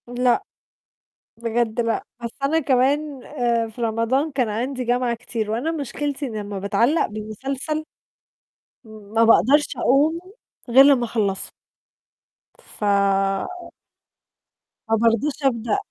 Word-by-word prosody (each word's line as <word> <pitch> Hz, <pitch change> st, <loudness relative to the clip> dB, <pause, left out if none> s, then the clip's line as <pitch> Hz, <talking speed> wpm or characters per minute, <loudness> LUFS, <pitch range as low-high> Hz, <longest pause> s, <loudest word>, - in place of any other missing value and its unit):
لأ، 245 Hz, 0 st, +1 dB, 0.9 s
بجد 230 Hz, 0 st, -1 dB
لأ، 230 Hz, -1 st, -1 dB, 0.2 s
بس 235 Hz, -, -2 dB
أنا 310 Hz, +4 st, +2 dB
كمان، 275 Hz, 0 st, +1 dB
آآ 235 Hz, -5 st, 0 dB
في 225 Hz, +2 st, -10 dB
رمضان 230 Hz, +7 st, 0 dB
كان 255 Hz, -5 st, 0 dB
عندي 250 Hz, +5 st, -3 dB
جامعة 245 Hz, 0 st, 0 dB
كتير، 225 Hz, -2 st, -4 dB
وأنا 245 Hz, +9 st, -1 dB
مشكلتي 290 Hz, -1 st, -3 dB
إني 220 Hz, -5 st, -4 dB
أمّا 205 Hz, -1 st, -5 dB
باتعلّق 235 Hz, -, +2 dB
بمسلسل 265 Hz, +8 st, -4 dB, 1.0 s
ما 220 Hz, +1 st, -2 dB
باقدرش 275 Hz, +6 st, +5 dB
أقوم 300 Hz, +5 st, +2 dB, 0.5 s
غير 265 Hz, +3 st, +8 dB
لمّا 270 Hz, -4 st, +4 dB
أخلّصه. 205 Hz, -4 st, -1 dB, 1.1 s
ف -, -, -10 dB, 2.1 s
ما 225 Hz, -, +4 dB
بارضاش 230 Hz, +6 st, +2 dB
أبدأ 230 Hz, -4 st, +1 dB
240 Hz, 110 wpm, -22 LUFS, 225-275 Hz, 2.1 s, غير